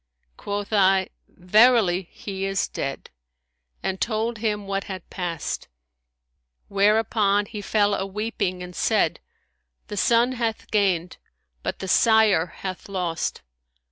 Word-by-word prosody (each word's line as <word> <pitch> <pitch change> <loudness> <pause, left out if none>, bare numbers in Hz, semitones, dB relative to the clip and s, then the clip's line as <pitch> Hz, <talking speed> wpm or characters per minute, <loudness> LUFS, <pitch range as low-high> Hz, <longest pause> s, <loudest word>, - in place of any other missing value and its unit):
Quoth 205 +1 -4
I, 190 -2 +4 0.2
Verily, 195 -2 +3
he 195 -2 -6
is 195 0 0
dead;' 135 - -5 0.7
and 190 0 -2
told 225 0 -1
him 210 -2 -1
what 195 0 -2
had 185 -3 -7
passed; 175 -5 -4 1.0
whereupon 205 0 +3
he 205 +1 -7
fell 205 0 +2
a 195 - -1
weeping 200 -3 -3
and 180 0 -9
said, - - +1 0.7
The 205 - -5
son 235 +4 +3
hath 230 -3 -3
gained; 185 -5 +1 0.4
but - - -3
the 190 - -6
sire 220 -4 +4
hath 185 +2 -7
lost.' 175 -4 -2
200 Hz, 120 wpm, -24 LUFS, 185-215 Hz, 1.0 s, I